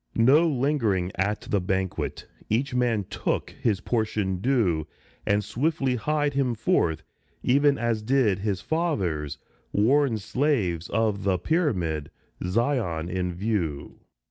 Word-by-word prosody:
No 140 +9 +5
lingering 120 - +1
at 105 +3 -1
the 100 - -1
banquet; 95 0 -2 0.2
each 125 +5 0
man 120 -4 +1
took - - -2
His 105 -5 -1
portion 105 -4 -1
due, 95 - +1 0.4
And 105 +1 +2
swiftly 130 - 0
hied 145 +3 0
him 135 -3 +1
forth, 85 -6 +1 0.4
even 140 +2 +4
as 115 -2 0
did 110 -4 +2
His 100 -2 -2
fathers, 95 - -1 0.3
worn 125 +3 +3
slaves 105 - 0
of 105 -2 0
the 95 -2 +2
pyramid, 90 - 0 0.3
Zion 90 - 0
in 90 -1 -1
view. 90 -8 -2
110 Hz, 120 wpm, -26 LUFS, 95-135 Hz, 0.4 s, No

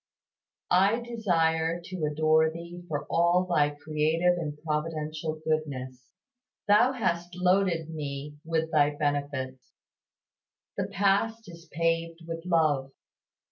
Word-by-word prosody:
I 195 +6 +4
desire 170 -8 0
to 175 -2 -4
adore 155 +1 +3
Thee 170 +2 -9
for 145 -3 -3
all 175 +2 +3
Thy 150 -5 +2
creative 155 +4 +1
and 150 -3 -4
providential 155 0 -2
goodness. 130 -5 -2 0.6
Thou 210 +6 +5
hast 175 -7 -2
loaded 180 -3 +1
me 145 -1 -6
with 160 0 -1
Thy 145 -2 +3
benefits. 140 -3 -3 1.0
The - - -2
past 205 +3 +1
is 170 -2 -13
paved 165 +1 -1
with 165 +1 -6
love. 155 -6 +2
165 Hz, 110 wpm, -28 LUFS, 150-175 Hz, 1.0 s, Thou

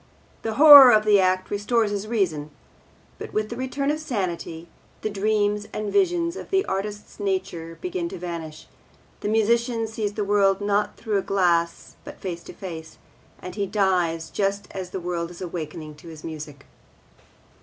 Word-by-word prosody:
The 225 -1 -3
horror 285 -2 +11
of 215 -1 +4
the 210 -1 +5
act 185 0 +1
restores 210 +1 +1
his 205 0 -3
reason; 175 -10 -1 0.7
but, - - -8
with 215 0 -1
the 235 - -5
return 270 +3 -1
of 305 - -2
sanity, 175 - -4 0.4
the 215 - -1
dreams 210 0 0
and 210 -1 -4
visions 350 -3 +2
of - - -8
the 385 0 +2
artist's 205 +3 -5
nature 185 -4 -3
begin 360 -1 -3
to - - -7
vanish; 165 -3 -7 0.5
the - - -4
musician 230 +1 +1
sees 215 -2 -3
the 210 - -2
world 200 -1 +3
not 205 0 0
through 215 -3 -1
a - - -1
glass 175 -4 0
but - - -10
face 175 -3 -5
to - - -10
face, 160 -4 -8 0.5
and 180 - -6
he 200 0 -2
dies 180 -5 0
just 200 0 -1
as 185 -2 -6
the 190 - -5
world 170 -1 -3
is 175 - -12
awakening 160 -3 -6
to 160 - -14
his 160 -2 -11
music. 150 -3 -8
200 Hz, 170 wpm, -24 LUFS, 175-220 Hz, 0.7 s, horror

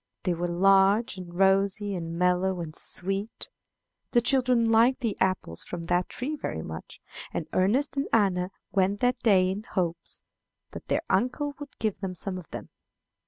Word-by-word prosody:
They 180 - +1
were 175 +1 -2
large, 195 +5 +3
and 180 -2 -8
rosy, 195 +2 +2
and 165 -2 -4
mellow, 180 +1 +1
and 160 -2 -6
sweet. 195 +4 +1 0.6
The 240 - +5
children 250 -2 +2
liked 230 +4 +4
the 230 -5 -1
apples 185 - -1
from 175 -1 -6
that 175 +1 0
tree 280 +5 -3
very 80 - -4
much, 80 +1 -8 0.3
and 165 - -3
Ernest 245 +10 +2
and 275 - 0
Anna 190 -5 +2 0.2
went 195 +1 +1
that 250 0 +2
day 185 -4 +4
in 195 +2 -4
hopes 180 -7 -3 0.5
that - - -9
their - - 0
uncle 285 +4 0
would 290 -1 -10
give 215 -3 -2
them 190 -2 -4
some 185 +1 -4
of 175 - -13
them. - - -8
195 Hz, 165 wpm, -27 LUFS, 180-230 Hz, 0.6 s, The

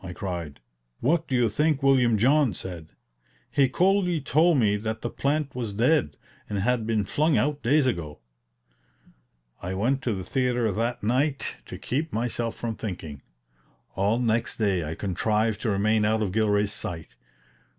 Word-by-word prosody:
I 90 -1 -6
cried. 85 -6 -5 0.4
What 165 +5 +1
do 130 - -1
you 120 -2 +3
think 145 +6 0
William 125 -5 +4
John 130 - +3
said? 85 -4 -7 0.6
He 135 -2 +3
coolly 180 +2 +2
told 155 +3 +3
me 105 -5 +3
that 110 +1 -4
the 120 - -3
plant 145 0 -1
was 115 -5 -4
dead, 120 - +2 0.3
and 105 - -2
had 115 +2 0
been 110 -3 +1
flung 155 +8 +1
out 145 +1 0
days 140 +4 +3
ago. 80 - -2 1.4
I 90 +2 -4
went 130 +8 0
to 120 -5 -1
the 95 - -5
theater 125 -2 0
that 115 +4 -2
night 135 +6 0
to - - -7
keep 155 +5 -3
myself 115 0 -2
from 115 -2 -4
thinking. 85 -9 -6 0.7
All 100 +4 +1
next 115 -2 0
day 100 -6 +1
I 80 +1 -4
contrived 105 +4 0
to 115 - -1
remain 105 +2 +2
out 110 +1 +2
of 100 - -2
Gilray's 105 -1 +1
sight. 80 -2 -5
115 Hz, 160 wpm, -26 LUFS, 100-135 Hz, 1.4 s, William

